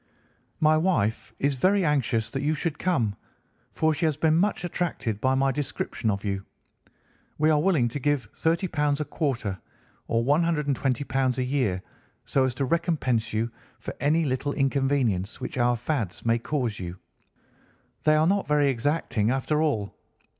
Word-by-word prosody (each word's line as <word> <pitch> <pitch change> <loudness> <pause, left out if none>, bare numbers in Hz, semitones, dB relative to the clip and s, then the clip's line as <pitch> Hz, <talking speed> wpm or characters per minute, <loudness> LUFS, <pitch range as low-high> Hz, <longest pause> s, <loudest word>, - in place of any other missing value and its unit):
My 155 0 +4
wife 140 - 0
is 140 +1 +1
very 185 +8 +2
anxious 125 -7 +1
that 135 - -2
you 150 +2 +1
should 150 -1 -3
come, 120 - +1 0.6
for 160 0 +1
she 155 +3 -1
has 155 -3 +1
been 155 0 +3
much 190 +2 +1
attracted 160 - -2
by 130 0 +2
my 135 0 +2
description 135 -4 -2
of 100 0 -2
you. 100 -1 -2 0.9
We 155 +1 +3
are 150 -1 +3
willing 160 -9 +3
to 145 - -4
give 140 -4 0
£ - - -31
30 165 +3 +1 0.3
a 150 - -1
quarter, 120 - -2 0.5
or 115 0 +1
£ - - -4
120 145 -3 +1 0.3
a 130 - +1
year, 125 -9 0 0.4
so 135 -1 +2
as 125 -2 -2
to 135 - 0
recompense 130 -8 0
you 115 +2 -1 0.3
for - - -6
any 155 +4 +2
little 140 +1 -1
inconvenience 135 -8 0
which 130 0 -5
our 120 0 +3
fads 120 - -3
may 115 0 +3
cause 120 -4 -2
you. 90 0 -6 1.0
They 155 0 +4
are 155 +1 +4
not 195 +3 +1
very 145 -1 +3
exacting, 125 -4 0
after 135 +4 +1
all. 110 -11 -1
140 Hz, 165 wpm, -26 LUFS, 115-155 Hz, 1.0 s, My